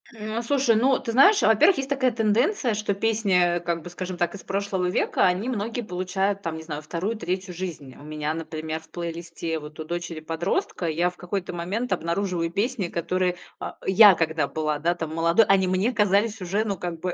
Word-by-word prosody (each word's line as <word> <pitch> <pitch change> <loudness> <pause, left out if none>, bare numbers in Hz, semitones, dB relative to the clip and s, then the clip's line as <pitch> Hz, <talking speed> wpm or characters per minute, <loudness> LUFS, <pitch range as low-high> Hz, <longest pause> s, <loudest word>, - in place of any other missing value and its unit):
М, 215 +1 -4
слушай, 255 -1 +2
ну 255 +4 +3
ты 250 -4 -4
знаешь, 395 - +6
во-первых, 225 - +5
есть 270 0 -3
такая 270 -2 +2
тенденция, 235 - +1
что 210 -1 -1
песни, 195 -5 +2
э, - - -2
как 170 -1 -3
бы, 175 - -8
скажем 185 0 -5
так, 175 -1 0
из 200 - -9
прошлого 195 -2 -1
века, - - +1
они 185 +7 +1
многие 230 +1 -2
получают, 190 0 -2
там 165 -4 -3
не 160 - -8
знаю, 150 -2 -5
2, 175 +8 -3
3 185 -1 -3
жизнь. 165 -7 -6
У - - -15
меня, 150 0 -3
например, 160 -1 -5
в 160 0 -21
плейлисте 165 -1 -5
вот 150 0 -11
у - - -3
дочери-подростка 170 +1 -3
я 170 +3 +1
в 180 - -23
какой-то 180 0 -4
момент 195 +8 -2
обнаруживаю 170 0 -1
песни, 205 0 -1
которые, 180 +2 -1 0.2
а, - - -6
я, 195 0 +8
когда 160 -3 0
была, 155 -1 -2
да, 170 +3 +1
там 160 -2 -5
молодой, 170 +6 +4
они 195 -2 +3
мне 185 +6 +1
казались 210 0 +2
уже, 195 +5 -1
ну, 200 -2 -1
как 170 -2 -5
бы, 180 +1 -2
185 Hz, 200 wpm, -25 LUFS, 165-215 Hz, 0.2 s, я